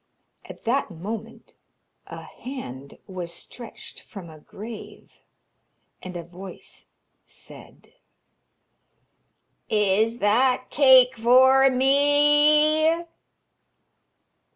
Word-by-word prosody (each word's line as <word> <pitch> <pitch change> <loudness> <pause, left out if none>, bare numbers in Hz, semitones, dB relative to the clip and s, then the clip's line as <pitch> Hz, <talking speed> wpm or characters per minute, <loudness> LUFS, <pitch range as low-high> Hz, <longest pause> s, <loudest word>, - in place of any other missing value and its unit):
At - - -13
that 250 +2 -1
moment 215 +6 -9 0.5
a - - -10
hand 140 - -10
was 180 -3 -7
stretched 230 +7 -11
from 185 -7 -12
a 155 - -15
grave, 215 +7 -12 0.8
and 185 -1 -8
a 170 - -7
voice 180 +3 -12 0.4
said: - - -15 1.8
'Is 215 +2 +1
that 250 +5 +1
cake 260 -2 +5
for 260 +3 +5
me?' 295 +4 +3
235 Hz, 80 wpm, -23 LUFS, 195-270 Hz, 1.8 s, cake